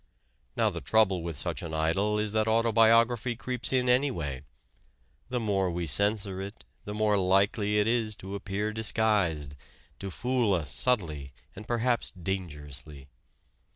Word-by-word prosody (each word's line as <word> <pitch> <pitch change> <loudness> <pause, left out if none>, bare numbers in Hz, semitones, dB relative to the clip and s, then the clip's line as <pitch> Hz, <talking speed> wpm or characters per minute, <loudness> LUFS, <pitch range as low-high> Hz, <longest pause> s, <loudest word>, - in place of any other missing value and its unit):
Now - - +2
the - - -6
trouble 100 -5 +3
with 85 -3 -5
such - - -3
an 80 -2 -5
idol 95 +7 +1
is 105 -1 -1
that 110 0 +1
autobiography 115 +1 +3
creeps 125 +1 -2
in 130 -1 +1
anyway. 120 - +1 0.9
The 125 -1 -1
more 100 -4 0
we 85 0 -3
censor 100 +2 +1
it, 100 +3 -9 0.2
the 105 - -5
more 105 -1 +2
likely 100 +3 +2
it 105 - +3
is 115 -2 +1
to 95 0 -9
appear 100 +2 -3
disguised, 100 -10 0 0.4
to 100 - -5
fool 120 +1 +1
us 75 -6 -3
subtly 75 - -1 0.2
and 105 - -10
perhaps 120 0 0
dangerously. 75 -6 -6
105 Hz, 145 wpm, -28 LUFS, 85-110 Hz, 0.9 s, trouble